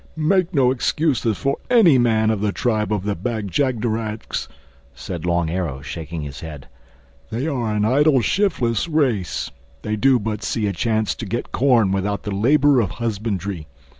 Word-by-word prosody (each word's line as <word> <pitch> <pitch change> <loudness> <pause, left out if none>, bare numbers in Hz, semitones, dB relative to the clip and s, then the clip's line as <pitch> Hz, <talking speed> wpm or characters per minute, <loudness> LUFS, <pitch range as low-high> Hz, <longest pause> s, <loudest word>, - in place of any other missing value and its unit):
"Make 170 +3 +1
no 135 -7 +3
excuses 130 - 0
for 140 0 -1
any 200 - +6
man 110 -2 +3
of 105 -2 -2
the 105 -1 +1
tribe 110 -1 -1
of 105 -3 0
the 105 0 -1
Bag 105 +1 -4
jagderags," 115 - -2 0.5
said 80 +6 -6
Long 85 -1 +1
Arrow 80 -7 -3
shaking 80 0 -6
his 70 0 -7
head. 75 -4 -9 0.6
"They 120 +5 -3
are 120 -8 -1
an 105 0 +1
idle 140 +4 +4
shiftless 140 - 0
race. 130 - 0 0.3
They 105 - -1
do 130 +4 +4
but 105 -1 -3
see 110 - -1
a 100 - -1
chance 110 +3 0
to 115 - -7
get 120 +5 -4
corn 120 -7 +3
without 100 +1 -1
the 105 - -4
labor 140 +6 +4
of 100 - -1
husbandry. 100 -7 -3
110 Hz, 165 wpm, -21 LUFS, 100-130 Hz, 0.6 s, any